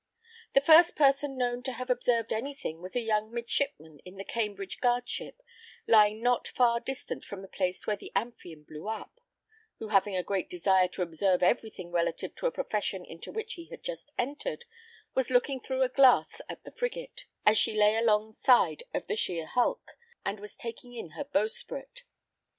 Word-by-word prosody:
The 275 - +7
first 330 +2 +8
person 275 -1 +3
known 245 -1 0
to 260 0 -4
have 255 +1 -3
observed 240 -2 +1
any 270 +6 -3
thing 165 - -6
was 185 +4 -8
a 245 - +2
young 215 -1 0
midshipman 230 - -2
in 180 +5 -13
the 195 - -6
Cambridge 205 -3 -3
guard 245 0 +2
ship, - - -5 0.4
lying 215 0 +5
not 245 0 +2
far 235 -2 +3
distant 265 +2 -5
from 195 -1 -8
the - - -9
place 185 -1 -2
where 210 - +1
the - - -11
Amphion 195 -8 -4
blew 150 +5 -9
up; 220 - -6 0.6
who 220 - -7
having 195 -1 +3
a 180 - 0
great 195 -1 -2
desire 185 +1 +3
to 180 0 -3
observe 180 +2 +1
every 220 +4 +3
thing 180 -4 -10
relative 170 -1 -1
to - - 0
a - - 0
profession 200 - -2
into 165 - -9
which 445 +1 -4
he 340 -2 -9
had - - -11
just - - -6
entered, 295 - -3 0.5
was 260 -2 0
looking 255 +2 +2
through 260 +1 -1
a - - +3
glass 255 -1 +4
at - - -8
the - - -11
frigate, - - -4 0.2
as 210 0 +6
she - - +1
lay 210 +1 +5
along 220 -1 +2
side 250 - +4
of - - -2
the 425 - -2
sheer 170 - -1
hulk, 255 - 0 0.3
and 200 +1 -2
was 210 +1 -6
taking 240 +1 -8
in 200 -9 -7
her 290 - -5
bowsprit. 475 - -3
230 Hz, 190 wpm, -29 LUFS, 195-270 Hz, 0.6 s, first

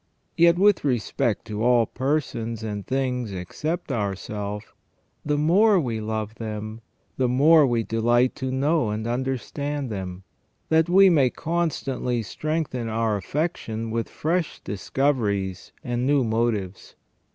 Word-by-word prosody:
Yet 170 0 +5
with 200 0 +4
respect 120 -3 0
to 110 -1 -4
all 120 -1 +4
persons 115 -5 -2
and 105 -2 -5
things 125 -4 -1
except 125 - -4
ourself, 105 0 -4 0.5
the 150 0 0
more 190 +7 +4
we 115 -7 -2
love 110 0 -3
them, 110 0 -5 0.4
the 130 - +2
more 145 +4 +6
we 120 -2 +1
delight 120 +3 +2
to 130 -1 -3
know 140 -1 +1
and 105 +1 -3
understand 135 +2 -3
them, 95 -2 -5 0.5
that 160 +1 +3
we 190 +1 +7
may 140 -6 +4
constantly 135 -7 -2
strengthen 150 -2 -3
our 110 -1 0
affection 115 - -3
with 115 0 -2
fresh 170 +2 -1
discoveries 100 -4 -1
and 120 0 -1
new 140 -2 +3
motives. 110 -4 -2
120 Hz, 130 wpm, -24 LUFS, 110-145 Hz, 0.5 s, we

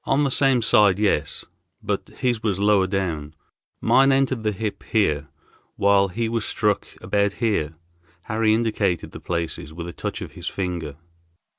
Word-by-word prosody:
"On 140 +2 +2
the 140 - +1
same 130 -3 +3
side, 100 -3 +5
yes; 100 -8 0 0.4
but - - -2
his 120 -3 0
was 100 -4 0
lower 100 -2 +3
down. 85 -6 -3 0.5
Mine 135 +1 +5
entered 135 -3 +1
the 110 -1 0
hip 105 +1 -4
here, 75 -10 0 0.5
while 100 0 +4
he 115 +5 -2
was 115 -1 -1
struck 105 -2 0
about 100 -1 +1
here." 100 -10 -1 0.5
Harry 110 0 +1
indicated 110 -5 0
the - - -9
places 85 -3 -4
with 85 0 -6
a 85 - -7
touch - - -4
of - - -9
his - - -8
finger. 85 -6 -3
100 Hz, 160 wpm, -23 LUFS, 90-115 Hz, 0.5 s, side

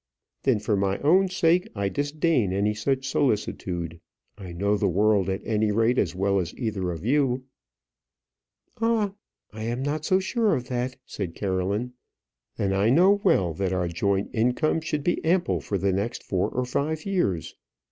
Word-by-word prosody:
"Then 130 -5 +2
for 105 0 0
my 95 0 0
own 185 +7 +4
sake 180 -1 +2
I 100 -1 0
disdain 145 - 0
any 100 +2 +1
such 135 +5 -1
solicitude. 90 - -1 0.4
I 95 -4 -9
know 100 +4 0
the 100 -1 +1
world, 100 +1 +2
at 95 +1 -3
any 110 -1 +1
rate, 115 +4 +2
as 90 -1 0
well 100 +1 +1
as 90 -1 -4
either 105 -7 -2
of 85 +3 -7
you 130 -1 +2 0.6
" - - -35
"Ah! 225 -3 +1 0.4
I 110 - -7
am 120 +3 -2
not 145 +2 -2
sure 200 +4 +2
of 125 -1 -5
that," 125 +1 -2
said 90 -5 -5
Caroline. 100 +5 -1 0.6
"And 95 -1 0
I 100 +3 +2
know 190 +9 +5
well, 85 -3 +3
that 95 +3 -1
our 90 -1 0
joint 95 +4 -1
income 125 +8 +1
should 150 -2 -2
be 175 - 0
ample 175 +2 +1
for 100 - -2
the 95 0 +1
next 100 +5 -2
four 95 -2 0
or 125 0 -2
five 150 +5 -2
years. 140 - -1
110 Hz, 170 wpm, -25 LUFS, 95-145 Hz, 0.6 s, know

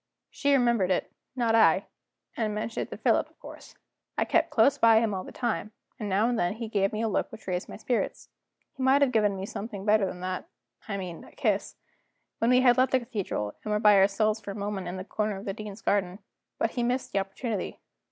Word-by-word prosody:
She 285 - 0
remembered 235 -8 +3
it, 185 - 0 0.2
not 235 -3 +1
I 225 - +5 0.5
and 215 -2 -1
mentioned 220 +1 -3
it - - -29
to - - -7
Philip, - - +2
of - - -30
course. - - -12 0.4
I - - +2
kept - - +2
close 280 - +3
by 225 -1 +6
him 225 -2 0
all 185 -1 -3
the - - -10
time, 225 -3 -2 0.3
and 210 -2 -3
now 200 +4 +2
and 240 -2 0
then 175 +2 +1
he 225 +1 -5
gave 195 -2 +1
me 215 +1 -2
a - - +1
look 210 - -1
which 220 - -11
raised 180 -1 -3
my - - -8
spirits. 240 +3 -2 0.5
He - - -8
might 270 +2 +5
have 270 - +2
given 210 -4 +2
me 190 0 -4
something 205 -1 -6
better 210 -2 +4
than 180 -1 -7
that 185 0 -4 0.4
I 200 -2 -3
mean 180 -3 -6
a - - -15
kiss - - -1 0.6
when 230 - +2
we 250 0 +5
had 245 -2 +5
left 260 +1 +3
the 260 - +5
cathedral, 200 - -3
and 215 - -4
were 210 - +2
by 210 -1 +6
ourselves 210 +3 +3
for 205 - -8
a 200 - -5
moment 200 -3 -4
in 180 +1 -4
a 185 - -6
corner 210 -1 -2
of 195 - -9
the 195 - -2
Dean's 210 0 -8
garden. 190 -2 +1 0.4
But 225 - 0
he 245 - -2
missed 245 +2 -1
the 200 - +2
opportunity. 195 +2 -4
210 Hz, 235 wpm, -28 LUFS, 195-230 Hz, 0.6 s, by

